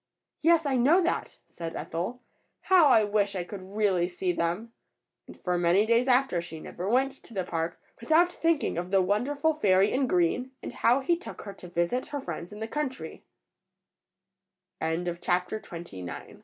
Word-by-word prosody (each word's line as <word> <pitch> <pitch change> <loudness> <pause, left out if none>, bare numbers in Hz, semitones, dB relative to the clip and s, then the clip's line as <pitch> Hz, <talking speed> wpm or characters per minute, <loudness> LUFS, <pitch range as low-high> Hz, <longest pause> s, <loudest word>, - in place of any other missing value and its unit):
"Yes, 330 0 +4
I 270 -2 +1
know 285 +9 +5
that," 340 - -2
said 165 -1 -7
Ethel, 190 +10 -4 0.4
"how 365 -5 +5
I 225 -5 +6
wish 205 -1 0
I 180 - -1
could 190 +2 -8
really 190 -5 +2
see 180 0 -2
them!" 175 +7 -2 0.5
And - - -13
for 180 -1 -1
many 175 +4 +4
days 235 +3 +3
after 250 -8 +3
she 165 -2 -8
never 180 +4 -5
went 265 +4 +3
to 230 - -14
the 190 - 0
park 165 -1 -3 0.2
without 325 +8 +3
thinking 330 - 0
of 175 +1 -5
the 195 0 +4
wonderful 265 +12 +1
fairy 195 -8 +3
in 260 0 +1
green, 185 +8 +1
and - - -6
how 245 +4 +3
he 340 +6 +2
took 350 - -9
her 200 - -7
to 180 - -12
visit 175 +8 -1
her 290 - -4
frie 220 - -5
215 Hz, 155 wpm, -28 LUFS, 180-270 Hz, 0.5 s, I